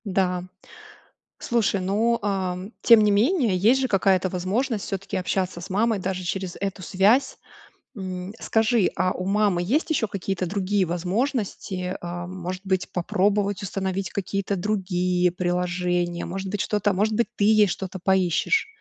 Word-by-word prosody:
Да, 185 Hz, -2 st, 0 dB, 1.0 s
слушай, 220 Hz, -4 st, 0 dB
ну, 220 Hz, +5 st, +1 dB
ам, 190 Hz, -1 st, -2 dB
тем 230 Hz, -2 st, +7 dB
не 210 Hz, -, +4 dB
менее, 230 Hz, -, +2 dB
есть 230 Hz, +8 st, +4 dB
же 260 Hz, -, +1 dB
какая-то 190 Hz, -3 st, +2 dB
возможность 200 Hz, +6 st, -1 dB
всё-таки 195 Hz, +1 st, -4 dB
общаться 185 Hz, -1 st, -2 dB
с 175 Hz, -, -8 dB
мамой 215 Hz, +3 st, +1 dB
даже 185 Hz, 0 st, -3 dB
через 185 Hz, 0 st, -3 dB
эту 195 Hz, -1 st, -3 dB
связь. 200 Hz, +10 st, +2 dB, 0.6 s
М, 185 Hz, -1 st, -5 dB
скажи, 225 Hz, -2 st, +2 dB
а 185 Hz, -, +1 dB
у 185 Hz, -, -5 dB
мамы 200 Hz, -2 st, +2 dB
есть 270 Hz, -, 0 dB
ещё 255 Hz, -8 st, +1 dB
какие-то 195 Hz, -1 st, -3 dB
другие 195 Hz, +1 st, 0 dB
возможности? 185 Hz, -, -2 dB
А, 175 Hz, 0 st, -5 dB
может 185 Hz, 0 st, -5 dB
быть, 190 Hz, -1 st, -1 dB
попробовать 200 Hz, +2 st, 0 dB
установить 190 Hz, 0 st, -2 dB
какие-то 200 Hz, 0 st, -2 dB
другие 180 Hz, -2 st, 0 dB
приложения? 175 Hz, -1 st, -1 dB
Может 190 Hz, +2 st, -5 dB
быть, 205 Hz, +1 st, -2 dB
что-то 210 Hz, -1 st, 0 dB
а -, -, +1 dB
может 210 Hz, +4 st, +1 dB
быть, 235 Hz, +2 st, +1 dB
ты 205 Hz, -, +1 dB
ей 215 Hz, -1 st, +5 dB
что-то 190 Hz, +2 st, -5 dB
поищешь? 190 Hz, -, +2 dB
190 Hz, 150 wpm, -24 LUFS, 180-210 Hz, 1.0 s, тем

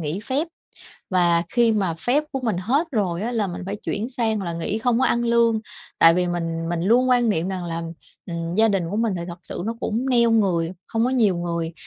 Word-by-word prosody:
nghỉ 160 Hz, +4 st, -3 dB
phép, 265 Hz, +9 st, -1 dB, 0.6 s
và 175 Hz, -2 st, +3 dB
khi 235 Hz, -2 st, +3 dB
mà 195 Hz, -6 st, 0 dB
phép 250 Hz, -, +1 dB
của 270 Hz, -, -2 dB
mình 225 Hz, -7 st, -1 dB
hết 270 Hz, -, +1 dB
rồi 185 Hz, -5 st, -1 dB
á 235 Hz, +3 st, -2 dB
là 220 Hz, -4 st, 0 dB
mình 175 Hz, 0 st, -6 dB
phải 200 Hz, +2 st, -3 dB
chuyển 205 Hz, +2 st, -3 dB
sang 220 Hz, -5 st, -1 dB
là 170 Hz, -, -3 dB
nghỉ 170 Hz, +6 st, -2 dB
không 235 Hz, +1 st, +1 dB
có 260 Hz, -, +2 dB
ăn 235 Hz, -, +1 dB
lương. 230 Hz, -1 st, +3 dB, 0.4 s
Tại 165 Hz, 0 st, +7 dB
vì 180 Hz, 0 st, +1 dB
mình 165 Hz, -1 st, -3 dB
mình 170 Hz, -1 st, -1 dB
luôn 240 Hz, +7 st, +3 dB
quan 245 Hz, -2 st, +3 dB
niệm 180 Hz, -3 st, 0 dB
rằng 185 Hz, -2 st, -4 dB
là, 165 Hz, -1 st, -4 dB, 0.4 s
ừm, 170 Hz, 0 st, -4 dB
gia 220 Hz, +2 st, +4 dB
đình 195 Hz, -4 st, +1 dB
của 205 Hz, -, -2 dB
mình 225 Hz, -3 st, +1 dB
thì 170 Hz, -, -4 dB
thật 170 Hz, +1 st, -7 dB
sự 175 Hz, -, -6 dB
nó 230 Hz, -, -2 dB
cũng 235 Hz, +5 st, -2 dB
neo 235 Hz, -2 st, +4 dB
người, 180 Hz, -6 st, +2 dB, 0.2 s
hông 225 Hz, +1 st, 0 dB
có 255 Hz, -, +1 dB
nhiều 215 Hz, -8 st, +2 dB
người, 170 Hz, -1 st, -3 dB
205 Hz, 240 wpm, -23 LUFS, 170-235 Hz, 0.6 s, Tại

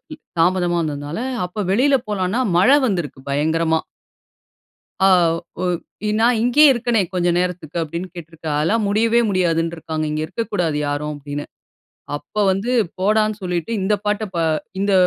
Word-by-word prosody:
ம். -, -, -32 dB, 0.2 s
தாமதமா 175 Hz, 0 st, +2 dB
வந்ததுனால, 145 Hz, +2 st, -4 dB, 0.3 s
அப்போ 195 Hz, +4 st, -5 dB
வெளில 270 Hz, +7 st, +4 dB
போலான்னா, 200 Hz, +3 st, 0 dB, 0.2 s
மழை 255 Hz, +11 st, +6 dB
வந்திருக்கு, 175 Hz, -, -3 dB
பயங்கரமா. 160 Hz, +3 st, +1 dB, 1.3 s
ஆ -, -, +6 dB, 0.5 s
ஒ -, -, 0 dB, 0.4 s
இ -, -, +1 dB
"நான் 235 Hz, 0 st, +4 dB
இங்கேயே 280 Hz, +5 st, +6 dB
இருக்கனே 235 Hz, -3 st, +1 dB
கொஞ்சம் 175 Hz, -1 st, +1 dB
நேரத்துக்கு." 180 Hz, -3 st, -4 dB
அப்படீன்னு 170 Hz, +4 st, -5 dB
கேட்ருக்கார். 160 Hz, -2 st, -5 dB
அதெல்லாம் 210 Hz, +9 st, +1 dB
முடியவே 225 Hz, +3 st, +3 dB
முடியாதுன்ருக்காங்க. 165 Hz, -4 st, -1 dB
"இங்க 155 Hz, 0 st, -2 dB
இருக்கக்கூடாது 175 Hz, -4 st, -2 dB
யாரும்." 145 Hz, +1 st, -2 dB
அப்படீன்னு. 145 Hz, 0 st, -6 dB, 0.7 s
அப்ப 210 Hz, +8 st, -3 dB
வந்து 195 Hz, +6 st, -2 dB, 0.3 s
போடான்னு 215 Hz, +2 st, +2 dB
சொல்லிட்டு, 180 Hz, +2 st, -2 dB
இந்த 200 Hz, +3 st, +2 dB
பாட்ட 210 Hz, +1 st, 0 dB
பா 170 Hz, -, 0 dB, 0.4 s
இந்த 200 Hz, 0 st, +1 dB
180 Hz, 135 wpm, -20 LUFS, 160-215 Hz, 1.3 s, மழை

